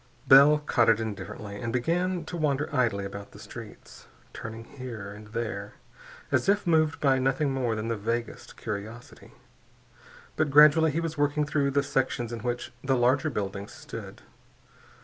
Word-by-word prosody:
Bell 140 +3 +8
codded 120 -7 +3
indifferently 100 -1 -6
and 115 - -2
began 170 +7 0
to 175 - -6
wander 150 -2 -1
idly 110 -6 +1
about 100 +1 -8
the - - -13
streets, - - -11 0.3
turning 115 0 -7
here 115 -6 -8
and 105 +1 -12
there 105 -2 -5 0.6
as - - +2
if 205 +1 +2
moved 160 -2 +2
by 135 -3 +3
nothing 135 +2 +1
more 125 -4 0
than 110 +1 -3
the 115 - -1
vaguest 115 +3 -4
curiosity. 110 +3 -7 1.0
But 155 -1 +1
gradually 150 +3 +7
he 155 +3 -1
was 165 -3 -4
working 145 +1 +2
through 145 -2 +1
the 140 +1 +1
sections 130 -4 -1
in 115 - -4
which 120 +2 -4
the 135 -1 +2
larger 130 +6 +2
buildings 100 -5 -4
stood. - - -9
130 Hz, 155 wpm, -27 LUFS, 110-150 Hz, 1.0 s, Bell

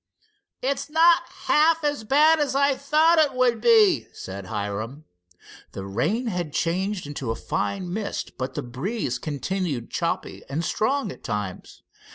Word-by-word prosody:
"It's 275 +2 -1
not 330 +2 +4 0.2
half 320 +1 +4
as 290 -6 -1
bad 305 +7 +5
as 290 -2 0
I 280 0 +4
thought 310 +5 +3
it 290 -4 +3
would 250 -3 +2
be," 435 -7 +5
said 95 0 -8
Hiram. 110 +8 -4 0.7
The 95 - -6
rain 125 - -1
had 175 -9 -3
changed 185 +4 -1
into 140 -4 -5
a 115 - 0
fine 180 - -3
mist, 210 0 -4
but 130 0 -5
the - - -3
breeze 130 - -3
continued 150 -3 -3
choppy - - -2
and 155 +5 -2
strong 260 -1 0
at - - -12
times. 105 -4 -5
200 Hz, 150 wpm, -24 LUFS, -, 0.7 s, bad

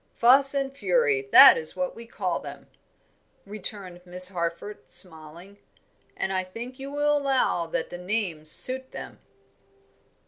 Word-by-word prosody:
Fuss 270 +4 +5
and 275 -1 -3
Fury, 455 - 0
that - - +9
is 475 - -8
what 275 -1 -4
we 230 0 -12
call - - -4
them," - - -11 0.8
returned 195 -3 -6
Miss 180 0 +1
Harford, 170 +3 -6
smiling, 170 +3 -3 0.6
"and 190 - -3
I 185 0 -2
think 235 +8 -10
you 270 +1 -8
will 295 +1 0
allow 265 -11 -1
that 165 - -4
the 175 - -8
names 180 -5 -3
suit 260 +9 +1
them." - - -10
210 Hz, 140 wpm, -24 LUFS, 180-270 Hz, 0.8 s, that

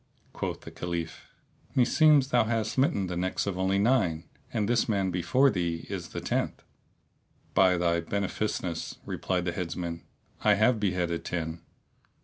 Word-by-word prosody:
Quoth - - -4
the - - -10
Caliph, 85 -2 -5 0.5
"Meseems 140 +2 +5
thou 120 -4 +3
hast 110 -1 0
smitten 130 - +1
the 90 -1 -4
necks 90 +2 -1
of 100 -2 -2
only 95 +1 +1
nine, 100 -8 +2 0.3
and 105 -2 0
this 120 0 +2
man 100 -3 +1
before 130 +11 +3
thee 85 -2 -2
is - - -4
the - - -5
tenth." - - -2 0.9
"By 90 -2 +5
thy 85 -1 +2
beneficence!" 95 -1 -3
replied 90 -2 -2
the 90 - 0
Headsman, 85 -1 -4 0.4
"I - - +5
have 110 +3 +3
beheaded 90 -4 -1
ten." 80 -1 -3
95 Hz, 145 wpm, -28 LUFS, 85-110 Hz, 0.9 s, Meseems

